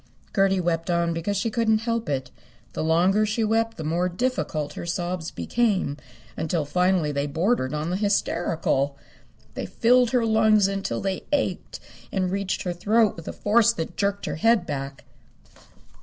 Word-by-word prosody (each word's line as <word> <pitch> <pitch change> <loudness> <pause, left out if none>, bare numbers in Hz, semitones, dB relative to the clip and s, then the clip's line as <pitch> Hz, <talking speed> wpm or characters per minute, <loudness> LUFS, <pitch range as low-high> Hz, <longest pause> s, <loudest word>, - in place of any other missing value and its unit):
Gertie 195 -2 +3
wept 170 -1 -1
on 170 -1 +1
because 175 +5 -2
she 220 +3 -1
couldn't 225 -2 +2
help 230 -5 -2
it. 130 -3 -2 0.4
The - - -2
longer 180 +6 +3
she 215 +2 0
wept 225 +1 0
the 160 - -5
more 170 +4 0
difficult 175 - -2
her - - -7
sobs 175 -1 -3
became, 205 -11 0 0.4
until 160 -1 -1
finally 180 0 +1
they 140 0 -1
bordered 160 - 0
on 155 +3 -2
the 185 - 0
hysterical. 165 -8 0 0.6
They - - -5
filled 245 0 +3
her 240 -1 +2
lungs 220 -2 +4
until 195 -12 -3
they 190 -1 -3
ached 290 -2 -1 0.3
and 185 -2 -1
reached 195 -1 -2
her 180 - -2
throat 210 +4 +2
with 165 - -11
a - - -2
force 230 +2 +3
that 165 -3 -5
jerked 200 0 -1
her - - -3
head 225 +1 +3
back. 135 -2 -5
185 Hz, 165 wpm, -24 LUFS, 165-220 Hz, 0.6 s, lungs